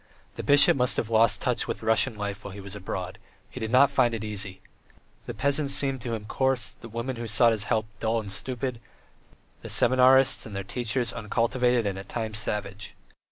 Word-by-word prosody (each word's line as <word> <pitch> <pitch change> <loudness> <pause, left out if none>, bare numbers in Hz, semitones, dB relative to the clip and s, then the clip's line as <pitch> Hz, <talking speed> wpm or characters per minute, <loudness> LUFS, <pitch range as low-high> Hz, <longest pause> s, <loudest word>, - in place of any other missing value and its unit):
The - - -6
bishop 145 0 +6
must 125 -2 +1
have 115 - -2
lost 115 0 +3
touch - - -1
with - - -5
Russian 115 +2 +3
life 105 0 -5
while 100 - -8
he - - -9
was 100 0 -8
abroad; 95 -2 -6 0.3
he - - -8
did 110 - -4
not 135 +2 +5
find 125 -4 +2
it 110 - -5
easy; 100 -3 -2 0.7
the - - -4
peasants 140 0 +2
seemed 135 -2 0
to 115 -1 -3
him 105 -2 -8
coarse, 130 +2 0
the 115 - -12
women 115 +3 -5
who 115 0 -5
sought 115 +2 +4
his 110 -2 0
help 110 -1 0
dull 115 0 0
and 100 -3 -7
stupid, 125 +2 -5 0.8
the - - -9
seminarists 130 +1 +4
and 105 - -9
their 100 - -4
teachers 120 +2 -2
uncultivated 120 +2 0
and 95 -1 -3
at 95 - -11
times 110 -2 -3
savage. 105 -1 -5
115 Hz, 200 wpm, -26 LUFS, 105-125 Hz, 0.8 s, bishop